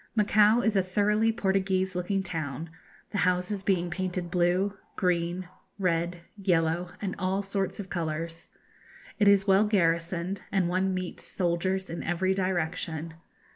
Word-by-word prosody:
Macao 215 +2 +5
is 220 -3 +1
a 195 - +5
thoroughly 210 +4 +2
Portuguese 190 -3 0
looking 190 +2 0
town, 160 -3 -4 0.4
the 205 - -1
houses 180 +2 +1
being 180 -3 0
painted 180 -1 -3
blue, 180 +3 +2 0.2
green, 175 0 0 0.3
red, 170 -2 0 0.2
yellow, 175 -2 +1
and 190 -1 -2
all 190 +1 0
sorts 195 +1 -2
of 195 -2 -7
colours. 165 -1 -3 0.7
It 205 - +4
is 200 -1 +6
well 195 +1 +5
garrisoned, 170 -1 0
and 190 -3 +2
one 185 +2 +1
meets 185 -1 -5
soldiers 185 +1 0
in 170 - -5
every 185 +2 +1
direction. 170 -3 -2
185 Hz, 135 wpm, -28 LUFS, 170-195 Hz, 0.7 s, is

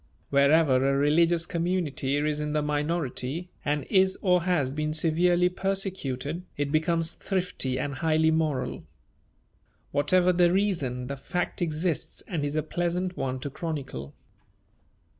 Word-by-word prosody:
Wherever 140 0 +5
a 135 +1 +2
religious 165 +4 +3
community 165 -6 -1
is 150 0 0
in 150 0 -2
the 150 -1 +1
minority 150 +1 -2
and 145 -1 0
is 190 -1 +3
or 180 -2 +4
has 150 -8 +1
been 155 +1 -2
severely 175 +3 +3
persecuted, 180 -6 -2 0.2
it 145 0 -1
becomes 165 +1 +1
thrifty 180 -9 -2
and 140 +2 -2
highly 160 +2 +2
moral. 155 -5 -1 1.1
Whatever 180 +5 +3
the 175 -1 +4
reason, 165 -11 0
the 140 +2 -5
fact 180 +7 -3
exists 165 0 -2
and 165 -6 -2
is 145 +1 -2
a 155 - +1
pleasant 175 +2 -2
one 130 -1 -2
to 140 - -5
chronicle. 135 - -5
155 Hz, 135 wpm, -27 LUFS, 140-175 Hz, 1.1 s, Wherever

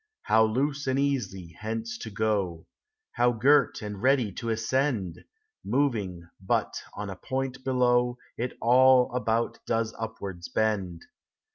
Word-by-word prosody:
How 110 0 +4
loose 135 +5 -1
and 130 0 +1
easy 125 -11 -2
hence 110 +1 -4
to 110 - -6
go! 100 -6 -1 0.5
How 120 0 +3
girt 135 +1 +3
and 105 -2 -6
ready 130 -4 +3
to 115 +5 -5
ascend! 115 - -1 0.4
Moving 105 -11 -1
but 95 - 0 0.2
on 100 -1 -5
a - - -6
point 130 +6 -4
below. 125 -1 +2 0.2
It 125 +2 -4
all 130 +1 +5
about 115 -1 0
does 115 -1 0
upwards 100 -6 -6
bend. 95 -6 -1
115 Hz, 130 wpm, -27 LUFS, 105-130 Hz, 0.5 s, all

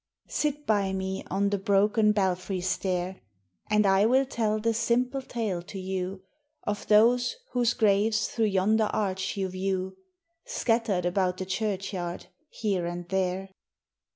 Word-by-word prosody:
Sit 295 0 -1
by 200 -3 +1
me 190 0 -3
on 200 +2 +1
the 200 - 0
broken 210 +2 +3
belfry 190 -2 0
stair, 185 0 -2 0.5
And 210 0 +3
I 195 +2 +4
will 260 +3 +4
tell 220 -4 0
the 230 +1 +1
simple 245 +4 +1
tale 220 -8 -3
to 185 +3 -9
you 185 0 -4 0.4
Of 205 -1 -3
those 240 - +4 0.2
whose 240 -1 +2
graves 215 -1 +2
through 225 - 0
yonder 210 +2 +2
arch 190 -1 -1
you 190 -1 0
view, 185 0 -3 0.5
Scattered 225 -6 0
about 180 0 +1
the 185 - -4
churchyard, 190 -3 -3 0.2
here 195 -6 -1
and 175 0 -5
there. 190 0 -1
200 Hz, 140 wpm, -27 LUFS, 185-220 Hz, 0.5 s, I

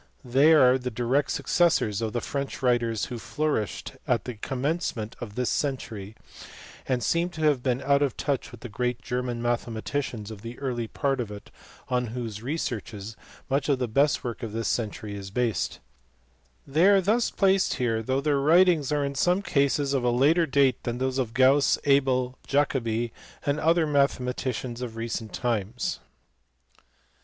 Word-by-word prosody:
They 135 +6 +5
are 130 -4 +6
the 125 0 -3
direct 125 +5 0
successors 155 - +1
of 110 -1 -1
the 120 - -2
French 140 +1 -4
writers 120 -4 +1
who 120 - -6
flourished 145 - -2
at - - +1
the 125 - -4
commencement 125 -1 -3
of 105 -4 -7
this 125 -1 0
century, 110 -7 -3 0.7
and 125 -2 0
seem 170 +1 +1
to 160 -3 -8
have 150 -5 +3
been 125 0 -1
out 140 +1 +3
of 140 -4 0
touch 140 -3 -1
with 120 - -12
the 120 - -6
great 125 +1 -2
German 125 -1 -3
mathematicians 120 -1 -2
of 105 -2 -9
the 115 +2 -8
early 125 -4 -3
part 135 +2 -1
of 115 -4 -3
it 105 -1 -10 0.4
on 125 -1 0
whose 110 -4 -5
researches 115 -6 -4 0.3
much 140 +2 0
of 140 - +3
the 125 -1 -1
best 140 +6 +2
work 120 -1 -5
of 115 -3 -5
this 115 0 -2
century 110 -2 -2
is 100 -1 -7
based; 115 +1 -1 0.9
they 160 +7 +3
are 200 -1 +6
thus 215 +6 +2
placed 195 -1 +2
here 115 -3 0
though 130 +4 0
their 145 -1 +1
writings 160 0 +4
are 145 -1 +1
in 140 - -3
some 180 +8 +1
cases 140 -2 +1
of 135 -3 +1
a 125 - +3
later 150 +8 +3
date 135 -2 +2
than 120 0 -3
those 130 +1 -1
of 115 -3 -2
Gauss, 135 +2 +5
Abel, 130 -2 +2
Jacobi, 120 -5 0 0.3
and 145 +1 +1
other 165 +1 +3
mathe 145 -3 +2
maticians 125 -1 -3
of 120 -3 -5
recent 115 -1 -4
times. 115 - -2
125 Hz, 170 wpm, -26 LUFS, 115-140 Hz, 0.9 s, are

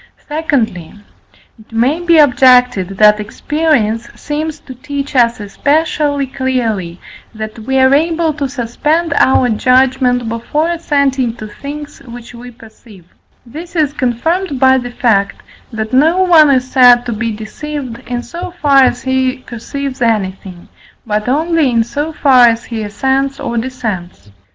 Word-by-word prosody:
Secondly, 270 - -2 0.6
it 220 - -19
may 250 +8 +1
be 340 -1 +3
objected 250 - +4
that 210 0 +5
experience 230 -1 -1
seems 310 +1 -4
to 260 - -10
teach 280 +2 -6
us 235 -2 +3
especially 285 +6 0
clearly, 235 -10 -3 0.4
that 215 +1 -7
we 265 +5 -2
are 260 +1 +4
able 325 +2 +1
to 280 -2 -3
suspend 290 +6 -1
our 260 -1 +3
judgment 250 +1 +2
before 235 +8 -2
assenting 280 -7 0
to 215 - -9
things 290 +7 -9
which 240 -2 -12
we 245 +1 -10
perceive; 220 -5 -17 0.4
this 325 +9 -10
is 300 -4 +1
confirmed 290 +5 -2
by 260 0 +5
the 245 -1 -6
fact 220 -5 0 0.3
that 220 +1 -5
no 325 +8 +3
one 325 -5 +5
is 255 -2 +2
said 245 -2 +5
to 240 - -3
be 230 +2 -3
deceived, 240 +3 -7
in 245 0 -4
so 340 +10 -7
far 280 -2 +4
as 260 - +1
he 260 0 0
perceives 270 +3 -6
anything, 190 -5 -2 0.4
but 215 +1 -2
only 315 +1 +1
in 230 -2 +2
so 290 +7 -4
far 260 -5 +5
as 230 0 0
he 230 -2 -5
assents 265 +6 -1
or 235 - -4
dissents. 215 - -5
255 Hz, 145 wpm, -14 LUFS, 230-290 Hz, 0.6 s, that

